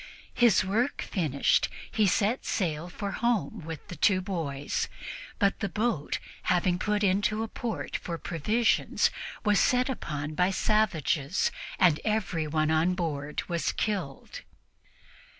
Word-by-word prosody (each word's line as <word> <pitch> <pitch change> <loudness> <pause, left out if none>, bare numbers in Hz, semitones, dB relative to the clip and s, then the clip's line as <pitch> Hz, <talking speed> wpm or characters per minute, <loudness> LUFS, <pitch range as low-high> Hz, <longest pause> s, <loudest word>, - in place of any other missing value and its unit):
His 235 -6 +4
work 230 +8 0
finished, 150 -7 +1 0.2
he 215 -2 +3
set 215 +6 +1
sail 170 -4 -1
for 200 +2 -4
home 225 -3 0
with 160 -1 -7
the 180 - -7
two 185 +1 +3
boys, 160 -7 -2 0.5
but 200 -2 +2
the 200 - -1
boat, 210 -6 -1 0.3
having 180 0 +2
put 210 +1 0
into 205 +3 +2
a - - -3
port 225 -1 -4
for 170 -1 -5
provisions, 210 +10 +1 0.3
was 205 -1 +4
set 250 +1 +3
upon 150 - -4
by 180 +4 +2
savages, 185 -7 +1 0.3
and 175 -5 +4
everyone 160 -8 0
on 165 +3 +3
board 150 -5 -3
was 170 -2 0
killed. 185 -11 -3
185 Hz, 130 wpm, -28 LUFS, 160-215 Hz, 0.5 s, His